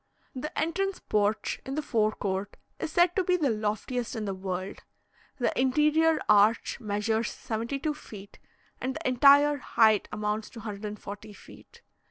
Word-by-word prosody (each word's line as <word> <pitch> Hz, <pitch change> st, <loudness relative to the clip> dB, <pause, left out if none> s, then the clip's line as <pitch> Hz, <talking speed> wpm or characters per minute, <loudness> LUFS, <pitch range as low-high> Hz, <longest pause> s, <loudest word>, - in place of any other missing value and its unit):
The 275 Hz, +3 st, -4 dB
entrance 375 Hz, +5 st, -1 dB
porch 210 Hz, +1 st, -1 dB
in 270 Hz, -, -5 dB
the 305 Hz, -, -2 dB
fore 215 Hz, -5 st, +1 dB
court 195 Hz, 0 st, -3 dB, 0.2 s
is -, -, -3 dB
said 350 Hz, +1 st, +3 dB
to 380 Hz, -, +2 dB
be 360 Hz, 0 st, +2 dB
the 290 Hz, -7 st, +1 dB
loftiest 220 Hz, +4 st, -2 dB
in 220 Hz, -2 st, -3 dB
the 195 Hz, -, -2 dB
world. 185 Hz, 0 st, -5 dB, 0.6 s
The 245 Hz, -, 0 dB
interior 305 Hz, +5 st, +3 dB
arch 210 Hz, +4 st, +4 dB
measures 220 Hz, +1 st, -1 dB
72 265 Hz, +6 st, -3 dB
feet, 205 Hz, -9 st, -12 dB, 0.4 s
and 260 Hz, +1 st, -2 dB
the -, -, -3 dB
entire 285 Hz, +3 st, +6 dB
height 220 Hz, -5 st, +3 dB
amounts 210 Hz, +1 st, -2 dB
to 230 Hz, -, -11 dB
140 210 Hz, 0 st, -7 dB
feet. -, -, -16 dB
230 Hz, 150 wpm, -28 LUFS, 210-290 Hz, 0.6 s, entire